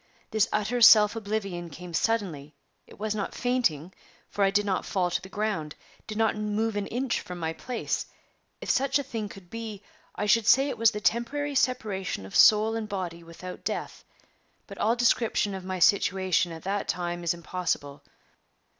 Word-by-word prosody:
This 220 Hz, 0 st, +2 dB
utter 215 Hz, +4 st, 0 dB
self 210 Hz, -1 st, +8 dB
oblivion 200 Hz, -5 st, -3 dB
came 175 Hz, +3 st, -10 dB
suddenly; 165 Hz, -9 st, -1 dB, 0.3 s
it -, -, -15 dB
was 215 Hz, 0 st, -2 dB
not 205 Hz, -2 st, -4 dB
fainting, 190 Hz, -, 0 dB, 0.4 s
for 205 Hz, -, 0 dB
I 195 Hz, -, +5 dB
did 205 Hz, +1 st, +1 dB
not 190 Hz, -2 st, 0 dB
fall 180 Hz, -2 st, -1 dB
to 175 Hz, -, -1 dB
the 190 Hz, -, -11 dB
ground, 200 Hz, -8 st, -3 dB, 0.3 s
did 215 Hz, -1 st, -5 dB
not 220 Hz, -1 st, +2 dB
move 210 Hz, +1 st, -1 dB
an 205 Hz, -1 st, -2 dB
inch 250 Hz, +1 st, -1 dB
from 180 Hz, -, -8 dB
my 160 Hz, -1 st, -2 dB
place. 245 Hz, +7 st, -3 dB, 0.5 s
If -, -, 0 dB
such 275 Hz, +1 st, +2 dB
a 285 Hz, -, -2 dB
thing 225 Hz, -6 st, -5 dB
could 185 Hz, -3 st, -13 dB
be, 220 Hz, -3 st, -6 dB, 0.3 s
I -, -, -2 dB
should 215 Hz, +1 st, +3 dB
say 270 Hz, +3 st, +5 dB
it -, -, -4 dB
was 230 Hz, -1 st, +6 dB
the 210 Hz, -1 st, -6 dB
temporary 240 Hz, +9 st, 0 dB
separation 215 Hz, -, -1 dB
of 95 Hz, -, -10 dB
soul 215 Hz, +1 st, +6 dB
and 220 Hz, -2 st, -4 dB
body 180 Hz, -4 st, -4 dB
without 170 Hz, +2 st, -10 dB
death; -, -, -4 dB, 0.6 s
but -, -, -11 dB
all 225 Hz, +2 st, +2 dB
description 230 Hz, -3 st, +2 dB
of 190 Hz, -1 st, -6 dB
my 185 Hz, 0 st, -4 dB
situation 190 Hz, -1 st, +2 dB
at 160 Hz, -1 st, -9 dB
that 200 Hz, +1 st, -2 dB
time 175 Hz, -1 st, -3 dB
is 170 Hz, 0 st, +1 dB
impossible. 170 Hz, -5 st, -3 dB
205 Hz, 180 wpm, -27 LUFS, 180-225 Hz, 0.6 s, self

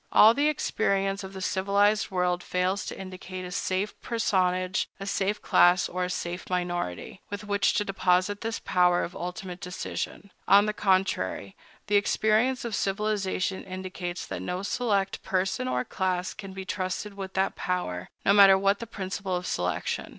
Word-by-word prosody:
All 220 Hz, +2 st, +8 dB
the 285 Hz, +4 st, +2 dB
experience 195 Hz, -8 st, 0 dB
of 190 Hz, 0 st, -8 dB
the 190 Hz, -1 st, -6 dB
civilized 200 Hz, +3 st, +2 dB
world 180 Hz, -2 st, 0 dB
fails 180 Hz, +2 st, -1 dB
to -, -, -6 dB
indicate 185 Hz, -1 st, -7 dB
a 180 Hz, -, -7 dB
safe 190 Hz, +3 st, -1 dB
personage, 185 Hz, -5 st, 0 dB
a 195 Hz, -, -5 dB
safe 200 Hz, +1 st, 0 dB
class, 175 Hz, 0 st, +5 dB
or 180 Hz, +1 st, -3 dB
a -, -, -4 dB
safe 180 Hz, 0 st, -4 dB
minority, 175 Hz, -, -3 dB
with 205 Hz, +1 st, -5 dB
which 200 Hz, -1 st, +1 dB
to 210 Hz, -, +1 dB
deposit 190 Hz, +1 st, +1 dB
this 225 Hz, 0 st, -2 dB
power 180 Hz, -1 st, +2 dB
of 175 Hz, -, -6 dB
ultimate 180 Hz, 0 st, -6 dB
decision. 185 Hz, +2 st, -5 dB, 0.2 s
On 200 Hz, +1 st, +7 dB
the 215 Hz, -, -1 dB
contrary, 185 Hz, -, 0 dB, 0.3 s
the 205 Hz, -, +3 dB
experience 220 Hz, +5 st, +2 dB
of 235 Hz, -, -4 dB
civilization 195 Hz, -1 st, -1 dB
indicates 185 Hz, -1 st, -5 dB
that -, -, -5 dB
no 180 Hz, +1 st, -3 dB
select 200 Hz, -3 st, 0 dB
person 185 Hz, -8 st, -1 dB
or 125 Hz, 0 st, -1 dB
class 185 Hz, -1 st, -1 dB
can 195 Hz, -2 st, -9 dB
be 190 Hz, 0 st, -7 dB
trusted 185 Hz, +2 st, -3 dB
with 190 Hz, -1 st, -7 dB
that 190 Hz, 0 st, +1 dB
power, 90 Hz, -, -3 dB, 0.2 s
no 200 Hz, -, +5 dB
matter 195 Hz, -1 st, +8 dB
what 195 Hz, +1 st, +2 dB
the 230 Hz, -, -6 dB
principle 190 Hz, -2 st, -4 dB
of 180 Hz, 0 st, -3 dB
selection. 90 Hz, -, -2 dB
190 Hz, 165 wpm, -27 LUFS, 180-200 Hz, 0.3 s, All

